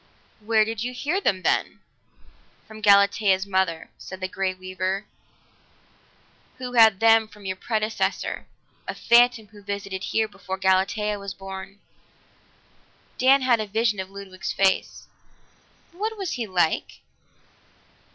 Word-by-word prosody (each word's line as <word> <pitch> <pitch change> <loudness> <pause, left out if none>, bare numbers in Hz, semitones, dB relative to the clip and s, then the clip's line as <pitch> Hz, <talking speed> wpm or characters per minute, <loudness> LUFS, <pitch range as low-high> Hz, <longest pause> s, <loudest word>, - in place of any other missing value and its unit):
"Where 215 0 +2
did 225 -1 -4
you 250 +1 -3
hear 295 +10 -1
them, 190 - 0
then?" - - 0 0.9
"From 215 0 -11
Galatea's 200 -1 +4
mother," 190 -4 -1
said 190 - -9
the 185 - -2
Grey 190 0 -2
Weaver, 185 +2 -4 1.5
"who 250 -1 -6
had 220 -5 +6
them 225 -1 +5
from 210 -2 -16
your 190 0 -2
predecessor 215 +2 -2 0.4
a - - -4
phantom 235 -2 +4
who 205 -1 -15
visited 200 -1 -5
here 220 0 0
before 190 -2 -7
Galatea 195 +2 +1
was 200 -2 -7
born." 195 +1 -9 1.4
Dan 265 +1 +5
had 245 -3 +3
a 215 - -3
vision 215 0 0
of 190 0 -5
Ludwig's 195 -1 -7
face. 190 -1 0 0.9
"What 430 +5 -4
was 385 -4 -3
he 235 -3 -3
like?" 175 -4 0
205 Hz, 130 wpm, -24 LUFS, 190-225 Hz, 1.5 s, had